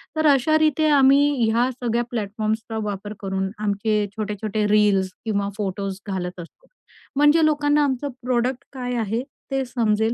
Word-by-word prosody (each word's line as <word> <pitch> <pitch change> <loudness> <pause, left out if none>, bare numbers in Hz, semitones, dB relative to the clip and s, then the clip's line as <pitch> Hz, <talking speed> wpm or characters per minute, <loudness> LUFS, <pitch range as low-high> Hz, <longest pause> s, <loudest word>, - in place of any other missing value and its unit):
तर 315 0 +2
अशारिते 310 +2 +3
आम्ही 280 0 +5 0.2
ह्या 240 +3 +2
सगळ्या 240 -1 -1
प्लॅटफॉर्म्सचा 220 +1 -3
वापर 205 0 -5
करून 190 -1 -2
आमचे 210 0 0
छोटे-छोटे 210 0 -2
रील्स 205 -3 +3 0.2
किंवा 200 -2 -1
फोटोज 195 -1 -3
घालत 180 -2 -4
असतो. 175 - -12 0.5
म्हणजे 295 +3 +5
लोकांना 295 -1 +2
आमचं 280 +1 -1
प्रॉडक्ट 250 +1 0
काय 250 -1 -4
आहे? 225 +2 -1 0.3
ते 270 0 0
समजेल, 225 -2 +1
225 Hz, 135 wpm, -23 LUFS, 205-270 Hz, 0.5 s, आम्ही